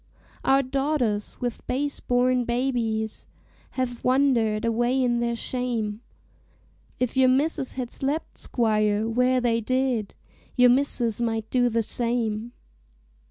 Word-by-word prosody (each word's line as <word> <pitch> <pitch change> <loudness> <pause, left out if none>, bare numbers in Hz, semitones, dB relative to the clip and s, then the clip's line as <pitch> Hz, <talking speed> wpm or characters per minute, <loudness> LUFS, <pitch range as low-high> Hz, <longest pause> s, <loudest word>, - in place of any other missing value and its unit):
"Our 270 +1 +4
daughters, 260 -6 -1
with 245 -2 -3
base 285 +3 -1
born 250 0 +2
babies, 235 -3 -2 0.5
Have 245 -2 -2
wandered 240 -5 +2
away 240 +3 +1
in 240 -2 +1
their 235 0 0
shame; 230 -3 -2 1.0
If 250 0 -1
your 260 -1 +5
misses 275 +1 +1
had 250 -2 -5
slept, 285 +4 -3
squire, 215 -2 +1
where 250 +2 +2
they 230 -2 +1
did, 255 -3 -1 0.4
Your 250 -1 +6
misses 245 -4 0
might 225 -2 -1
do 245 -1 +3
the 230 0 0
same. 230 -1 -1
245 Hz, 120 wpm, -25 LUFS, 225-255 Hz, 1.0 s, Your